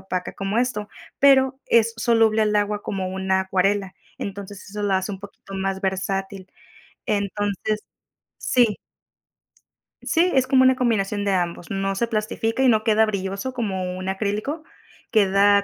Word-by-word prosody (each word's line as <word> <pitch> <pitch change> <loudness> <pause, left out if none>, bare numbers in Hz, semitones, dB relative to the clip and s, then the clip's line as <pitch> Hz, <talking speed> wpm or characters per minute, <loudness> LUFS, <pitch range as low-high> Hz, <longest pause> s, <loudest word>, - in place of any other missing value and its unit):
opaca 185 -1 -4
como 195 +2 -3
esto, 240 -4 0 0.3
pero 265 -1 +5
es 230 0 +4
soluble 225 -1 +3
al 210 -1 +2
agua 205 0 0
como 190 -2 -3
una 190 0 0
acuarela, 190 +1 0 0.2
entonces, 200 0 -7
eso 210 +1 -5
lo 200 -2 +1
hace 190 +2 -1
un 190 - -7
poquito 200 0 -12
más 195 0 -2
versátil, 195 0 -3 0.6
entonces, 205 +1 -1 0.6
sí. 235 -5 +2 1.3
Sí, 350 +2 +2
es 260 -1 +4
como 260 0 +4
una 260 0 +5
combinación 210 -5 0
de 200 - +1
ambos, 175 0 -2
no 195 0 -1
se 235 - +1
plastifica 225 +2 -1
y 265 - +5
no 220 -3 +4
queda 220 0 +4
brilloso 200 +4 -3
como 190 -6 -3
un 185 +1 -4
acrílico, 210 +10 -2 0.5
queda 200 -1 +4
205 Hz, 150 wpm, -23 LUFS, 195-225 Hz, 1.3 s, pero